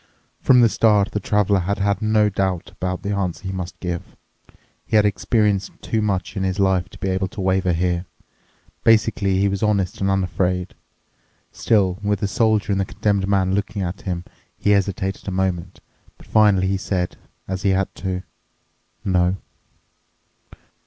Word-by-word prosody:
From 125 -2 +5
the 115 - +7
start 105 -2 +3
the 105 - -1
Traveler 105 -1 +2
had 100 +3 -1
had 100 +1 0
no 110 -1 +3
doubts 95 -2 -2
about 90 -1 -4
the 100 - -2
answer 95 -3 -2
he 95 - -3
must 95 -1 -6
give. 90 -1 -5 0.7
He - - -2
had 105 -1 +5
experienced 105 -1 +1
too 110 - -1
much 95 -3 -1
in 95 - -2
his 95 +1 -1
life 95 -2 +2
to - - -14
be - - -3
able 95 0 0
to 95 - -11
waver 95 -1 +1
here. 85 +1 0 0.8
Basically 110 -3 +3
he 100 +1 +3
was 100 -1 -2
honest 100 -4 0
and 100 - +1
unafraid. 90 -1 0 0.8
Still, 95 -4 +1
with 105 -1 0
the 100 - +1
Soldier 105 +1 +1
and 95 0 +1
the - - -1
Condemned 100 0 0
Man 95 -1 +2
looking 100 0 -1
at 90 +2 -4
him, 90 -3 -3 0.3
he 105 - +1
hesitated 100 -1 0
a - - -1
moment. 95 -1 -2 0.4
But - - -17
finally 105 -3 +4
he 95 +1 +1
said, 90 -2 -2 0.3
as 95 0 -3
he 100 - +2
had 95 0 0
to, 95 -1 -3 0.8
"No." 90 0 +2
95 Hz, 170 wpm, -21 LUFS, 95-105 Hz, 0.8 s, the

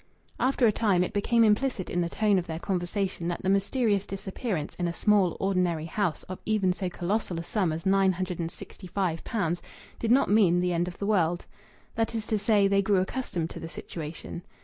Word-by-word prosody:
After 255 0 +2
a 220 - +6
time 200 -5 +2
it - - -4
became 230 +3 +3
implicit 215 -2 +2
in 175 - -1
the 170 - -1
tone 205 0 +2
of 175 - -6
their 160 -1 -4
conversation 185 0 -2
that 175 - -3
the 190 - +2
mysterious 200 +1 +1
disappearance 195 - -4
in 175 - +1
a 170 - -2
small, 200 -3 +2
ordinary 180 -5 0
house 175 0 -1
of 185 - -7
even 200 -4 +2
so 185 0 -3
colossal 180 +1 -2
a - - -4
sum 185 -2 0
as 160 +1 -5
nine 195 0 +4
hundred 180 -1 -4
and 165 -1 -2
sixty 185 +2 -11
five 180 -4 -1
pounds 175 -6 -1 0.4
did 230 - -1
not 260 +4 +5
mean 195 -5 +4
the 180 0 +1
end 170 +1 0
of 180 - -7
the 200 - -3
world. 175 -4 +1 0.5
That 225 0 -1
is 220 -1 -2
to 215 - 0
say, 205 -1 +4
they 200 0 +3
grew 200 0 +2
accustomed 185 -5 -2
to - - -7
the 165 - -7
situation. 165 +1 -7
190 Hz, 215 wpm, -28 LUFS, 175-210 Hz, 0.5 s, a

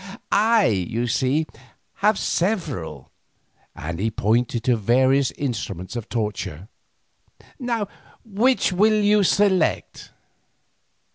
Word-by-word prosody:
I, 220 0 +4
you 110 +4 0
see, 135 +5 +1 0.5
have 210 0 +2
several," 165 - -2 0.6
and 85 +2 -6
he 110 +3 0
pointed 115 +2 0
to 125 -1 +3
various 130 +5 +2
instruments 110 - -4
of 120 -3 -6
torture. 105 -5 -4 1.6
"Which 225 +1 +1
will 215 +3 +3
you 210 0 +3
select?" 190 -3 +1
130 Hz, 90 wpm, -22 LUFS, -, 1.6 s, I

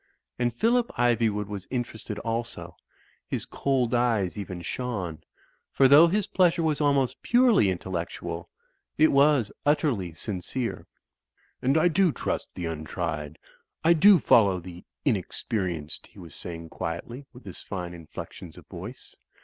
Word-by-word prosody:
And 120 0 +1
Phillip 235 - +2
Iv3nvood 115 -4 +2
was 100 -2 -7
interested 115 -4 -4
also; 115 -7 -4 0.5
his - - -3
cold 130 -3 0
eyes 115 -6 +1
even 95 -4 -6
shone; 95 -7 -3 0.5
for 135 - +5
though 145 +5 +8
his 200 +3 +1
pleasure 175 -2 +2
was 155 -2 +1
almost 140 -3 +1
purely 240 - +4
intellectual, 90 -1 -4 0.5
it 155 - +5
was 140 -5 +4
utterly 140 - +1
sincere. 105 +7 -4 0.7
"And 135 +4 +2
I 160 - +5
do 175 +1 +3
trust - - -3
the 90 - -4
untried; 80 -1 -4 0.5
I 165 +1 +6
do 195 +4 +7
follow 100 -9 +4
the 90 0 -10 0.2
inex 110 - -1
perienced," 90 -9 -3
he - - -23
was 85 -6 -11
sa)ring 85 -1 -6
quietly, 115 - -6
with 125 0 -15
his 95 - -8
fine 90 -3 -5
inflec 85 -3 -8
tions - - -11
of - - -13
voice. - - -10
115 Hz, 140 wpm, -27 LUFS, 90-140 Hz, 0.7 s, though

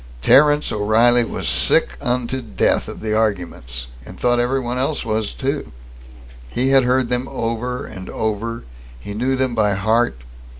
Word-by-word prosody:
Terence 145 - +5
O'Reilly 115 +4 +3
was - - -4
sick - - +2
unto 125 +1 -1
death 115 -3 0
of - - -8
the 110 -1 -1
arguments, 90 - -2 0.2
and - - -12
thought 120 0 +2
everyone 125 0 -1
else 140 0 -1
was, 110 -1 -1
too. 140 +2 -3 0.8
He 130 - 0
had 135 -2 +5
heard 125 -1 +1
them 125 +1 -1
over 125 +1 -3
and 95 0 -9
over; 110 +2 -3 0.4
he 100 +12 -7
knew 125 +5 0
them 130 -1 0
by 105 -3 +2
heart. 110 - +1
120 Hz, 155 wpm, -20 LUFS, 110-130 Hz, 0.8 s, Terence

